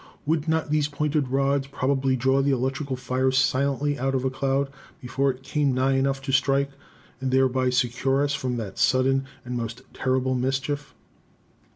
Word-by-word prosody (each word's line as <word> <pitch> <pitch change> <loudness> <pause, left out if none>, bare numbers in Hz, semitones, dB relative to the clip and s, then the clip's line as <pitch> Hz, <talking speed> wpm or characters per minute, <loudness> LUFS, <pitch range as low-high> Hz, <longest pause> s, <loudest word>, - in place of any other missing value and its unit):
Would 155 +1 0
not 160 -1 0
these 150 -1 +2
pointed 150 -1 -1
rods 135 +1 +1
probably 135 -1 0
draw 130 +2 +2
the 140 - +1
electrical 135 +1 -1
fire 130 +1 0
silently 140 +2 +1
out 135 +1 0
of 130 0 -1
a 130 - +1
cloud 135 +1 0 0.3
before 135 +3 0
it 130 0 -4
came 140 -1 0
nigh 130 +1 +2
enough 135 0 0
to 135 - -2
strike, 140 +1 +2 0.5
and 130 0 -2
thereby 130 -1 +2
secure 125 +2 +1
us 145 0 0
from 130 -4 -2
that 105 -5 -6
sudden 135 +1 +3 0.2
and 125 0 -4
most 115 0 -4
terrible 130 0 0
mischief?" 135 +3 -2
135 Hz, 170 wpm, -25 LUFS, 130-140 Hz, 0.5 s, sudden